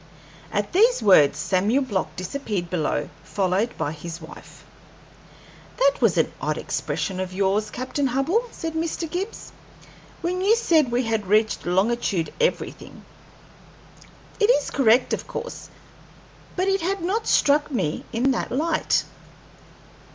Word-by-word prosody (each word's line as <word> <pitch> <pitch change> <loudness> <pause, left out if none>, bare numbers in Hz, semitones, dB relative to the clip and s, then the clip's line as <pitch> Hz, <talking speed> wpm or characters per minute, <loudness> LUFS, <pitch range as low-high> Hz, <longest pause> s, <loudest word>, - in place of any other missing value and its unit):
At - - -2
these 440 - +4
words 150 -8 +6
Samuel 205 - +1
Block 205 -8 -3
disappeared 185 -2 -4
below, 155 -4 -1
followed 195 +4 -1
by 145 - -2
his 165 +2 -7
wife. 160 0 -13 1.1
"That - - +2
was - - +3
an - - +1
odd - - -1
expression 185 -2 -3
of 185 0 -4
yours, 200 +2 +1
Captain 260 +4 -2
Hubbell," 305 - 0
said 325 -7 -5
Mr. 325 +1 -2
Gibbs, 370 +7 -5 0.7
"when 360 +2 -1
you 410 +4 +4
said 320 - +2
we 245 +2 +1
had 225 -3 -1
reached 215 0 +2
longitude 190 -1 0
everything. 485 - -2 1.3
It 420 0 +3
is 390 -12 +3
correct, 245 -1 +3
of - - -3
course, - - -7 0.9
but 370 +1 0
it 390 0 +1
had 375 +1 -2
not 420 +6 -1
struck 290 +1 +3
me 185 - -2
in 250 +3 +2
that 250 - -2
light." 310 +5 +1
245 Hz, 135 wpm, -24 LUFS, -, 1.3 s, words